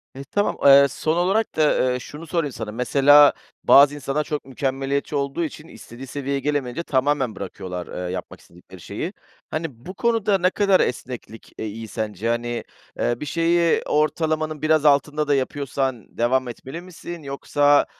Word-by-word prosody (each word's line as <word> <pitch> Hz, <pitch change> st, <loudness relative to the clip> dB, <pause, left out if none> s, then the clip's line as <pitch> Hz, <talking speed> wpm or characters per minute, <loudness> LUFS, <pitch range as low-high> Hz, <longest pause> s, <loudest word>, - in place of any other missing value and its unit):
Eee, 135 Hz, -, -7 dB
tamam. 205 Hz, 0 st, 0 dB
Eee, 140 Hz, 0 st, +8 dB
son 155 Hz, +4 st, -1 dB
olarak 195 Hz, +6 st, +1 dB
da, 150 Hz, -4 st, +2 dB
eee, 125 Hz, -, -2 dB
şunu 150 Hz, +6 st, -10 dB
sorayım 165 Hz, -3 st, -1 dB
sana, 110 Hz, -2 st, -6 dB
mesela 140 Hz, +5 st, +6 dB, 0.3 s
bazı 145 Hz, +1 st, +7 dB
insanlar 145 Hz, +2 st, -2 dB
çok 150 Hz, -2 st, -4 dB
mükemmeliyetçi 135 Hz, +2 st, -2 dB
olduğu 140 Hz, +4 st, -1 dB
için 155 Hz, 0 st, -7 dB
istediği 130 Hz, -3 st, -11 dB
seviyeye 140 Hz, +1 st, -3 dB
gelemeyince 145 Hz, +1 st, -2 dB
tamamen 135 Hz, -5 st, 0 dB
bırakıyorlar, 90 Hz, -2 st, -6 dB, 0.2 s
eee, -, -, -4 dB
yapmak 90 Hz, -, -7 dB
istedikleri 90 Hz, +1 st, -16 dB
şeyi. -, -, -5 dB, 0.4 s
Hani, 150 Hz, -7 st, -5 dB
bu 185 Hz, -, -7 dB
konuda 220 Hz, -2 st, +1 dB
ne 185 Hz, 0 st, +2 dB
kadar 195 Hz, -1 st, +3 dB
esneklik, 120 Hz, -2 st, -4 dB
eee, -, -, -4 dB
iyi 110 Hz, +2 st, -7 dB
sence? 110 Hz, 0 st, -3 dB
Hani, 120 Hz, 0 st, -2 dB, 0.4 s
eee, 120 Hz, 0 st, 0 dB
bir -, -, -5 dB
şeyi 170 Hz, +2 st, +2 dB
ortalamanın 155 Hz, 0 st, 0 dB
biraz 155 Hz, -1 st, +2 dB
altında 150 Hz, +1 st, +3 dB
da 145 Hz, -, +3 dB
yapıyorsan 135 Hz, -2 st, -3 dB
devam 125 Hz, +2 st, +1 dB
etmeli 135 Hz, +7 st, -8 dB
misin? 175 Hz, -2 st, -9 dB
Yoksa, 145 Hz, +1 st, +2 dB
140 Hz, 160 wpm, -22 LUFS, 125-155 Hz, 0.4 s, Eee